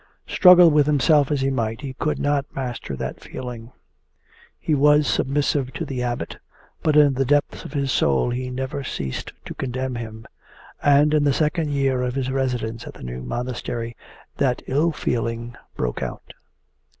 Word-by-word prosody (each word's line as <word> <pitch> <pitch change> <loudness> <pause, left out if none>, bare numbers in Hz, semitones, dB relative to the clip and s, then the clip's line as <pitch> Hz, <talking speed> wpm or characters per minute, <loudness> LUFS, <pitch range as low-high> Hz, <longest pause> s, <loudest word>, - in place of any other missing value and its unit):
Struggle 180 -2 +7
with 150 -1 +4
himself 145 0 +4
as 145 -3 0
he 135 0 +1
might, 115 -3 -2
he 135 -3 -5
could 150 +3 -1
not 145 -1 -1
master 125 - -4
that - - -5
feeling. 120 -2 -8 0.9
He 155 - -1
was 150 +1 +5
submissive 140 -1 0
to 165 - -4
the 135 -4 -4
Abbot, 120 -1 -3 0.4
but 155 -2 +2
in 145 -2 +6
the 135 +1 +1
depths 145 +2 0
of - - -8
his 140 -2 0
soul 70 - +2
he 125 +1 -3
never 130 +2 -4
ceased 65 - -4
to - - -6
condemn 130 0 -3
him. 110 -2 -7 0.6
And 145 +1 +4
in 150 -1 +3
the 140 -1 +3
second 155 +1 0
year 135 -3 +1
of 125 0 -2
his 130 -1 -1
residence 125 -4 -2
at - - -9
the - - -11
new 60 0 -6
monastery 120 - -4 0.4
that 130 -3 +1
ill 150 +5 +1
feeling 115 -3 -3 0.2
broke - - -2
out. - - -6
130 Hz, 170 wpm, -23 LUFS, 120-145 Hz, 0.9 s, Struggle